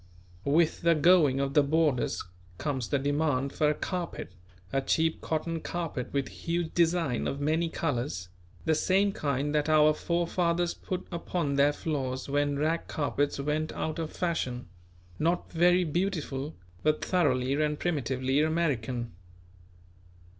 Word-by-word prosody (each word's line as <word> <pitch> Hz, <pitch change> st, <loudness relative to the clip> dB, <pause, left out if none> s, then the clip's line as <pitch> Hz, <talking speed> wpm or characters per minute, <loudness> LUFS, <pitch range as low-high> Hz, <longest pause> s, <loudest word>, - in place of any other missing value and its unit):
With 160 Hz, +3 st, +3 dB
the 170 Hz, 0 st, +4 dB
going 155 Hz, -4 st, +5 dB
of 140 Hz, 0 st, -1 dB
the 150 Hz, -, +6 dB
boarders 150 Hz, -2 st, +1 dB, 0.3 s
comes 130 Hz, -6 st, -2 dB
the 140 Hz, -, +2 dB
demand 140 Hz, -1 st, 0 dB
for 150 Hz, -, +2 dB
a 150 Hz, -, +1 dB
carpet; 180 Hz, -, -4 dB, 0.4 s
a 135 Hz, -, +2 dB
cheap 160 Hz, +4 st, +1 dB
cotton 165 Hz, +1 st, -2 dB
carpet 165 Hz, -7 st, -4 dB
with 140 Hz, -2 st, -1 dB
huge 170 Hz, -1 st, -3 dB
design 165 Hz, -6 st, +1 dB
of 140 Hz, -, -3 dB
many 160 Hz, +3 st, +1 dB
colours, 125 Hz, -, -2 dB, 0.4 s
the 160 Hz, -, +3 dB
same 195 Hz, +5 st, +2 dB
kind 145 Hz, -5 st, -1 dB
that 150 Hz, 0 st, +1 dB
our 155 Hz, 0 st, +6 dB
forefathers 170 Hz, +1 st, 0 dB
put 185 Hz, -1 st, -5 dB
upon 170 Hz, -3 st, -2 dB
their 140 Hz, +1 st, +4 dB
floors 135 Hz, -4 st, -3 dB
when 145 Hz, 0 st, +1 dB
rag 160 Hz, +3 st, 0 dB
carpets 145 Hz, -1 st, -1 dB
went 150 Hz, +2 st, -1 dB
out 155 Hz, +1 st, -3 dB
of 160 Hz, -1 st, -2 dB
fashion; 130 Hz, -8 st, -2 dB, 0.5 s
not 170 Hz, +3 st, 0 dB
very 175 Hz, +2 st, +4 dB
beautiful; 155 Hz, -4 st, -2 dB, 0.3 s
but 155 Hz, 0 st, +1 dB
thoroughly 135 Hz, -8 st, +2 dB
and 150 Hz, -1 st, 0 dB
primitively 135 Hz, -4 st, 0 dB
American. 130 Hz, -7 st, 0 dB
155 Hz, 140 wpm, -29 LUFS, 140-170 Hz, 0.5 s, the